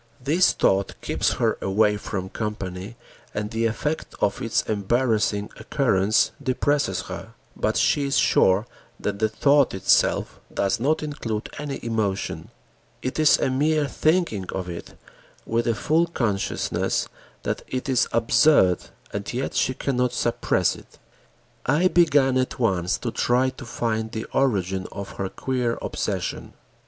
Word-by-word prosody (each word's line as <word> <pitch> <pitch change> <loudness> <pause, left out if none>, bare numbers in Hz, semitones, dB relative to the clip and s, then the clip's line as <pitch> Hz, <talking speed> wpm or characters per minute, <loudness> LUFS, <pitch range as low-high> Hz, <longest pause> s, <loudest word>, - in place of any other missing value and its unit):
This 150 +8 +3
thought 95 0 +1
keeps - - 0
her - - 0
away 105 +2 +2
from 95 -2 -4
company 100 -1 -5 0.4
and 105 +1 -3
the 115 0 +1
effect 150 +7 -3
of 100 - 0
its 115 0 +1
embarrassing 110 -1 0
occurrence 110 -6 +2
depresses 140 +2 0
her, - - -8 0.2
but - - 0
she 145 - +2
is 140 - +1
sure 95 +4 +4 0.3
that 100 -1 -3
the 110 0 +2
thought 140 +2 +3
itself 95 - +2
does 100 +4 0
not 150 +6 +1
include 115 -8 -4
any 145 -2 -4
emotion. 110 -4 -2 0.5
It 130 - -2
is 155 -1 +6
a 130 - 0
mere 150 +3 +2
thinking 155 - +1
of 95 -1 -4
it 85 -1 -8 0.5
with 115 +1 0
a 115 - +2
full 160 +9 +2
consciousness 110 - -1 0.4
that - - -2
it 130 +1 -4
is 130 -3 +2
absurd, 115 - +4 0.3
and 100 0 -4
yet 130 +3 -3
she 130 - +1
cannot 125 -2 0
suppress 120 -1 +1
it. - - -16 0.7
I 150 +7 +4
began 145 -7 +4
at 130 - -2
once 95 -7 +1
to - - -4
try 125 +2 +2
to 130 - -10
find 110 -2 -2
the 110 -1 -4
origin 95 -8 +1
of 100 -1 -6
her 95 -1 -2
queer 125 -1 -1
obsession. - - -3
115 Hz, 145 wpm, -24 LUFS, 105-135 Hz, 0.7 s, is